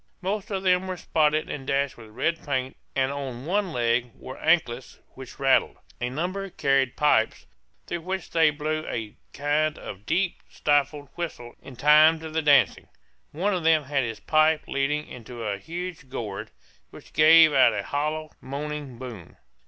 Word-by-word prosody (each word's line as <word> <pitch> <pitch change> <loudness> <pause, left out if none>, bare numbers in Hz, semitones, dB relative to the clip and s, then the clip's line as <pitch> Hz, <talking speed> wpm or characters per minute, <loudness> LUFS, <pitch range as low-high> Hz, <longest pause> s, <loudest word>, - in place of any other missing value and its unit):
Most 195 +2 -2
of 195 -2 -3
them 185 0 +2
were 185 -1 -4
spotted 155 -2 +1
and 135 -2 -6
dashed 140 0 0
with 110 -2 -13
red 135 +9 -2
paint, 130 -2 -2 0.2
and 135 0 +1
on 135 -3 -6
one 195 +2 0
leg 120 -1 +1
wore 130 - -9
anklets 135 -7 +1 0.2
which 130 -1 -11
rattled. 135 -1 +2 0.2
A 125 - -1
number 185 +8 -3
carried 135 -5 +1
pipes 130 -7 +2 0.4
through 170 - -4
which 185 +1 -5
they 160 -2 +5
blew 155 +1 -2
a 110 -3 -5 0.2
kind 150 +2 0
of 100 +2 -9
deep 175 +2 0
stifled 145 -1 0
whistle 155 -9 -6
in 130 - -11
time 150 +5 +6
to 160 -1 -7
the 160 +1 0
dancing. 145 -3 +3 0.4
One 190 +7 0
of 180 -3 -2
them 160 -1 +4
had 140 -1 0
his 115 -3 -4
pipe 155 +2 +2
leading 145 +2 -1
into 120 -1 -9
a 100 -2 -2
huge 170 - -7
gourd, 105 -6 -5 0.4
which - - -15
gave 160 0 +7
out 135 -2 +5
a - - -2
hollow, 155 +2 -2
moaning 145 -1 -5
boom. 115 -8 -9
150 Hz, 170 wpm, -25 LUFS, 130-160 Hz, 0.4 s, gave